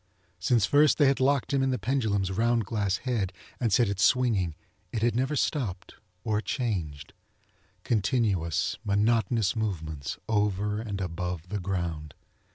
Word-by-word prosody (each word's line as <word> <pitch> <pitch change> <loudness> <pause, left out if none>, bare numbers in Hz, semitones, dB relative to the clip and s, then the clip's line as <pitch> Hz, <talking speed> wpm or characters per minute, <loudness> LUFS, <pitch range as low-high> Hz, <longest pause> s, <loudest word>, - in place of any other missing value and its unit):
Since 110 +2 +3
first 145 +4 +4
they 145 - +5
had 135 0 +3
locked 140 +1 +2
him 135 - +3
in 135 - +2
the 130 - 0
pendulum's 105 -5 0
round 115 +2 +1
glass 100 -2 0
head 115 -7 -1 0.3
and 115 -3 0
set 115 +4 +4
if 100 -1 -3
swinging 105 -8 +2 0.4
it 110 - -2
had 120 -1 +2
never 130 +4 0
stopped 105 - -2 0.3
or 105 -1 0
changed. 85 - -3 0.7
Continuous, 105 - 0
monotonous 110 0 +2
movements 80 -10 -3
over 105 -1 0
and 100 -4 -4
above 90 -1 -4
the 105 - -2
ground. 85 -5 -3
105 Hz, 145 wpm, -28 LUFS, 95-120 Hz, 0.7 s, they